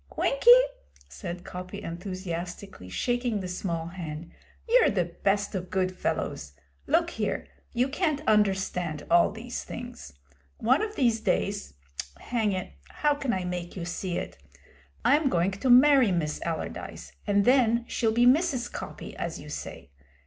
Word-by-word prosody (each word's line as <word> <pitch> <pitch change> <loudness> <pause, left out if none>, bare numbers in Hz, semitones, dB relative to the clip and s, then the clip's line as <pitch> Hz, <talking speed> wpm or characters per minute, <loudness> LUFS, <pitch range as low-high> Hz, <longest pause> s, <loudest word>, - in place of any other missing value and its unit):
'Winkie,' - - +3 0.6
said 175 -3 -7
Coppy 185 +3 -7
enthusiastically, 180 - -6
shaking 245 - 0
the 185 - -4
small 170 -2 -3
hand, 165 -2 -7 0.4
'you're 485 +1 +5
the 185 -4 +1 0.2
best 200 +1 +1
of 185 -2 -4
good 185 -1 0
fellows. 70 - -3 0.3
Look - - +2
here, - - -2 0.3
you 245 +2 +1
can't 305 0 -1
understand 190 -7 +1
all 170 0 +5
these 230 +3 -6
things. 245 0 -8 0.5
One 255 +6 +3
of 430 0 -3
these 235 -4 +2
days 200 - -1 0.4
hang 225 -4 -1
it, 185 - -4 0.2
how 295 -1 +1
can 280 -3 -2
I 185 -4 -1
make 180 -1 -4
you 175 -3 -4
see 175 0 -3
it! - - -6 0.7
I'm 290 0 +4
going 175 -2 +2
to 200 +7 -2
marry 260 -2 +7
Miss 155 -4 -1
Allardyce, 165 -2 -5 0.2
and 200 -1 +3
then 240 -2 +4
she'll 225 -1 +1
be 240 +2 +3
Mrs. 260 -2 +3
Coppy, - - -7
as - - -4
you - - -10
say. - - -7
200 Hz, 150 wpm, -27 LUFS, 180-245 Hz, 0.7 s, marry